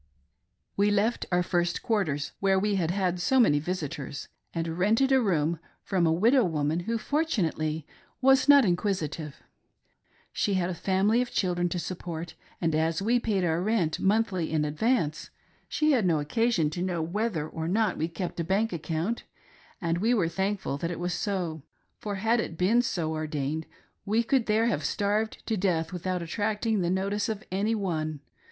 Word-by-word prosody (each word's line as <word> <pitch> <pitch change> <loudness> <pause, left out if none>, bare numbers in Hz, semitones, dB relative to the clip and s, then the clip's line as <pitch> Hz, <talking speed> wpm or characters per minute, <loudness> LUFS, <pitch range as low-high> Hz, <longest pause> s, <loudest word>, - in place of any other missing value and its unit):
We 200 +1 +3
left 210 +3 +1
our 180 0 +3
first 175 -1 0
quarters, 170 - 0
where 195 -1 +3
we 205 +2 +1
had 180 -5 0
had 180 -1 0
so 260 +9 +2
many 150 -12 +5
visitors, 150 -4 -4 0.2
and 165 0 -3
rented 225 +8 +3
a 265 -1 +5
room 170 -6 +1 0.2
from 180 -4 +1
a - - +3
widow 230 +10 +4
woman. 155 -2 0
Who 230 +6 -2
fortunately 170 - -1 0.3
was 270 +2 +4
not 285 -3 +8
inquisitive.. 175 -5 -1 1.0
She 200 - 0
had 180 -1 0
a - - -2
family 195 +6 +2
of 250 - -2
children 175 -2 0
to 180 - -3
support, 170 -2 -5 0.3
and 165 -2 0
as 160 +1 +1
we 240 +3 +3
paid 210 -5 0
our 165 0 +1
rent 185 -6 0
monthly 195 -5 +1
in 155 -1 +1
advance, 155 - 0 0.4
she 305 0 +2
had 235 -9 +3
no 160 -3 +2
occasion 165 0 +1
to 175 - -4
know 180 -3 -1
whether 175 -2 -2
or 160 0 -4
not 215 +5 +1
we 160 - -1
kept 170 +1 -5
a - - +1
bank 195 +6 0
account, 165 +7 -2 0.5
and 170 -3 -1
we 230 +5 +3
were 185 -7 +2
thankful 190 -4 -2
that 165 - -2
it»was 175 0 -2
so, 175 -5 -2 0.4
for, 205 -1 -4
had 225 +5 +2
it 170 -7 -3
been 210 +8 +4
so 170 -9 -2
ordained, 155 0 -3 0.4
we 220 +3 +1
could 245 0 +1
there 220 +1 +3
have 205 -10 0
starved 210 +2 -1
to 225 - 0
death 180 -4 0
without 180 0 -2
attracting 210 +4 -1
the 175 - 0
notice 200 +4 0
of 215 -1 -3
any 205 +4 +1
one. 155 -7 -2
185 Hz, 175 wpm, -28 LUFS, 165-215 Hz, 1.0 s, not